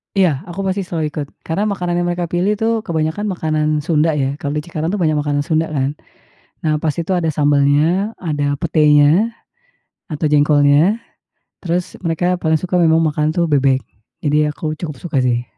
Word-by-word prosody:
Iya, 180 Hz, -8 st, +3 dB
aku 175 Hz, +2 st, -8 dB
pasti 190 Hz, +1 st, -1 dB
selalu 160 Hz, -4 st, -2 dB
ikut, 145 Hz, -1 st, -4 dB, 0.2 s
karena 195 Hz, +6 st, -1 dB
makanan 180 Hz, -4 st, -2 dB
yang 175 Hz, -, 0 dB
mereka 175 Hz, -1 st, -2 dB
pilih 180 Hz, +4 st, +1 dB
tu 220 Hz, +2 st, -1 dB, 0.2 s
kebanyakan 160 Hz, +5 st, -1 dB
makanan 155 Hz, -5 st, -1 dB, 0.2 s
Sunda 160 Hz, -1 st, +1 dB
ya, 140 Hz, -1 st, -1 dB
kalau 145 Hz, 0 st, -3 dB
di 150 Hz, -, -2 dB
Cikarang 160 Hz, -1 st, -4 dB
tuh 205 Hz, -, -1 dB
banyak 155 Hz, -2 st, +2 dB
makanan 145 Hz, -1 st, -1 dB
Sunda 160 Hz, 0 st, 0 dB
kan. 140 Hz, -1 st, -2 dB, 0.7 s
Nah, 155 Hz, -1 st, +2 dB
pas 155 Hz, -2 st, 0 dB
itu 170 Hz, +3 st, -2 dB
ada 170 Hz, -3 st, 0 dB
sambalnya, 145 Hz, +6 st, +2 dB
ada 145 Hz, -4 st, -1 dB
petenya, 155 Hz, +5 st, +4 dB, 0.8 s
atau 155 Hz, 0 st, -2 dB
jengkolnya, 150 Hz, +5 st, +4 dB, 0.6 s
terus 175 Hz, 0 st, -2 dB
mereka 175 Hz, +1 st, 0 dB
paling 160 Hz, -1 st, +2 dB
suka 185 Hz, +3 st, -5 dB
memang 160 Hz, -1 st, +4 dB
makan 150 Hz, 0 st, 0 dB
tuh 170 Hz, +1 st, 0 dB
bebek, 135 Hz, -3 st, +2 dB, 0.4 s
jadi 150 Hz, 0 st, +2 dB
aku 155 Hz, +1 st, -4 dB
cukup 155 Hz, -2 st, -6 dB
suka 165 Hz, -3 st, -2 dB
sih. 120 Hz, -1 st, 0 dB
155 Hz, 175 wpm, -18 LUFS, 145-175 Hz, 0.8 s, petenya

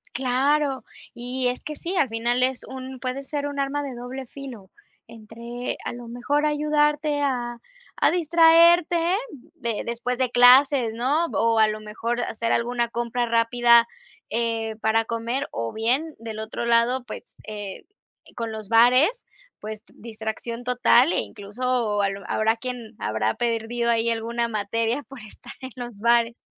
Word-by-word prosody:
Claro, 270 Hz, +2 st, +1 dB, 0.3 s
y 250 Hz, +1 st, -2 dB
es 250 Hz, -, -4 dB
que 305 Hz, -, -5 dB
sí 355 Hz, +5 st, -4 dB
al 295 Hz, -, +3 dB
final 235 Hz, +2 st, 0 dB
es 255 Hz, 0 st, +1 dB
un 260 Hz, 0 st, -8 dB
puede 255 Hz, +1 st, -3 dB
ser 290 Hz, +1 st, -4 dB
un 285 Hz, -1 st, -5 dB
arma 280 Hz, +1 st, -1 dB
de 275 Hz, -2 st, -5 dB
doble 250 Hz, +2 st, -7 dB
filo. 245 Hz, -7 st, -10 dB, 0.4 s
Entre 235 Hz, +2 st, -7 dB
a -, -, -3 dB
lo 240 Hz, 0 st, -9 dB
mejor 270 Hz, +5 st, -1 dB
ayudarte 300 Hz, 0 st, +1 dB
a 245 Hz, -4 st, -1 dB, 0.4 s
a, -, -, +4 dB
distraerte 335 Hz, 0 st, +5 dB
de 340 Hz, +3 st, +2 dB, 0.6 s
de -, -, -4 dB
después 240 Hz, +1 st, -2 dB
de 255 Hz, -1 st, 0 dB
clases, 250 Hz, -1 st, +6 dB
¿no? 270 Hz, +8 st, +1 dB
O 230 Hz, 0 st, +2 dB
a 220 Hz, -, +6 dB
lo 215 Hz, 0 st, -4 dB
mejor 230 Hz, +3 st, -3 dB
hacer 230 Hz, -1 st, -1 dB
alguna 235 Hz, 0 st, 0 dB
compra 235 Hz, +1 st, -2 dB
rápida, 235 Hz, 0 st, +4 dB, 0.4 s
eh, 225 Hz, -1 st, -2 dB
para 220 Hz, +1 st, +2 dB
comer, 235 Hz, +5 st, -3 dB
o 115 Hz, 0 st, -4 dB
bien, 245 Hz, +8 st, +1 dB
del 220 Hz, -1 st, -7 dB
otro 220 Hz, +2 st, -4 dB
lado, 235 Hz, +2 st, +3 dB
pues, 235 Hz, -, -10 dB
eh, 205 Hz, -2 st, -7 dB, 0.5 s
con 230 Hz, -2 st, -3 dB
los 215 Hz, -2 st, -8 dB
bares, 255 Hz, -, +4 dB, 0.3 s
pues 215 Hz, 0 st, -7 dB
distracción 225 Hz, +1 st, -6 dB
total 250 Hz, +3 st, +4 dB
e -, -, +1 dB
incluso 220 Hz, 0 st, -2 dB
a 200 Hz, -, +2 dB
lo 195 Hz, 0 st, -7 dB
habrá 220 Hz, +1 st, +2 dB
quien 235 Hz, -2 st, -7 dB
habrá 110 Hz, +1 st, -1 dB
perdido 235 Hz, 0 st, -1 dB
ahí 230 Hz, 0 st, +2 dB
alguna 235 Hz, +1 st, -1 dB
materia 230 Hz, +4 st, -1 dB
por 275 Hz, -1 st, -10 dB
estar 215 Hz, -2 st, -12 dB
en 260 Hz, -1 st, -8 dB
los 240 Hz, -4 st, -8 dB
bares. 235 Hz, +1 st, +2 dB
240 Hz, 160 wpm, -24 LUFS, 225-265 Hz, 0.6 s, clases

